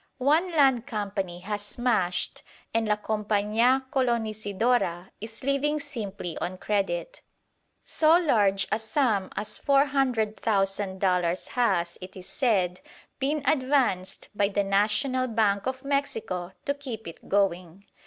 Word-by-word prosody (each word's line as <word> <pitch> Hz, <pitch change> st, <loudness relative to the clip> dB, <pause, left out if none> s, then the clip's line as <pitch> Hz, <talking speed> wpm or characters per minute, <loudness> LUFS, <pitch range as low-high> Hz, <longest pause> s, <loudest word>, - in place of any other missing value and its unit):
One 305 Hz, +7 st, +3 dB
land 270 Hz, -6 st, +3 dB
company 200 Hz, -6 st, -3 dB
has 205 Hz, +2 st, -3 dB
smashed, 205 Hz, -5 st, 0 dB, 0.3 s
and 225 Hz, -1 st, +1 dB
La 210 Hz, -, +3 dB
Compañía 215 Hz, +4 st, +1 dB
Colonisidora 220 Hz, -6 st, 0 dB
is 220 Hz, +2 st, -7 dB
living 280 Hz, +2 st, +1 dB
simply 210 Hz, -, -5 dB
on 185 Hz, +1 st, -3 dB
credit. 195 Hz, -4 st, -2 dB, 0.6 s
So 320 Hz, +1 st, +4 dB
large 205 Hz, -, +2 dB
a 215 Hz, -, +1 dB
sum 220 Hz, -4 st, 0 dB
as 210 Hz, 0 st, -4 dB
400,000 220 Hz, -8 st, +1 dB
dollars 180 Hz, -2 st, +1 dB
has, 185 Hz, -8 st, 0 dB
it 185 Hz, +1 st, -9 dB
is 185 Hz, -, -9 dB
said, 190 Hz, -9 st, +1 dB, 0.4 s
been 285 Hz, +2 st, 0 dB
advanced 260 Hz, -9 st, +1 dB
by 205 Hz, -1 st, +2 dB
the 200 Hz, 0 st, 0 dB
National 210 Hz, +7 st, +1 dB
Bank 215 Hz, -2 st, +1 dB
of 260 Hz, +1 st, -4 dB
Mexico 280 Hz, -, -2 dB
to 280 Hz, -, +1 dB
keep 255 Hz, -8 st, -7 dB
it 165 Hz, -, -11 dB
going. 190 Hz, -1 st, 0 dB
215 Hz, 125 wpm, -27 LUFS, 195-260 Hz, 0.6 s, So